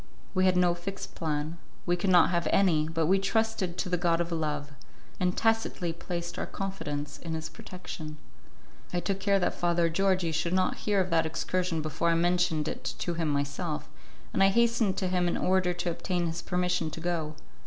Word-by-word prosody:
We 185 -1 +3
had 185 -1 +4
no 180 -1 +4
fixed 175 +3 -6
plan, 155 +1 -2 0.3
we 175 - +2
could 180 +2 -1
not 180 -1 +6
have 170 -1 +1
any, 165 -6 +3
but 165 0 +1
we 190 +4 +4
trusted 195 -3 0
to - - -1
the 180 -1 0
god 170 -1 +2
of 170 0 -1
love, 150 -3 -2 0.5
and 180 0 +1
tacitly 225 -6 +1
placed 170 0 -5
our - - -2
confidence 150 -7 -4
in 165 -1 -4
his 160 0 -4
protection. 155 -4 -8 0.7
I 175 - 0
took 195 +2 -1
care 200 0 +3
that 180 - +1
Father 170 -1 +2
Georgi 185 -1 +2
should 165 +2 0
not 185 0 +2
hear 205 -1 +4
of 185 -1 0
that 165 -1 +3
excursion 170 0 -1
before 155 +2 0
I 165 - +3
mentioned 175 -2 +2
it - - -4
to 175 - -2
him 165 -2 -1
myself, 145 +3 -2 0.5
and - - +1
I 195 - +8
hastened 230 -1 +3
to 185 - 0
him 180 -1 +1
in 175 - 0
order 185 -1 +2
to 175 0 -2
obtain 175 +1 -1
his 165 0 -3
permission 180 -2 0
to 160 - -7
go. 165 -3 -2
175 Hz, 195 wpm, -29 LUFS, 165-185 Hz, 0.7 s, I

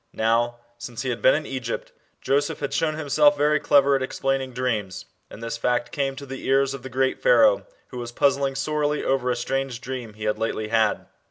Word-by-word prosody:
Now, 115 +2 +1 0.2
since 120 +1 -6
he 130 - -1
had 120 - -4
been 130 - +5
in 155 0 -2
Egypt, 130 -4 -5 0.3
Joseph 140 +2 0
had 140 -1 -3
shown 155 0 0
himself 150 -1 +3
very 150 +1 +3
clever 140 0 +4
at 135 - 0
explaining 135 0 -1
dreams, 115 -7 -3 0.2
and 115 - -11
this 115 0 -3
fact 125 +5 0
came 135 -3 -1
to 140 0 -8
the 135 -1 -8
ears 135 0 +3
of 135 - -7
the 130 - -8
great 130 +1 0
Pharaoh, - - +4 0.2
who 125 - -7
was 120 0 -6
puzzling 140 +1 +1
sorely 150 +1 -1
over 130 -2 0
a 125 - +1
strange 135 0 -2
dream 125 -5 -6
he 105 - -9
had 105 0 -1
lately 110 -1 -2
had. 110 -1 +1
135 Hz, 205 wpm, -24 LUFS, 120-140 Hz, 0.3 s, been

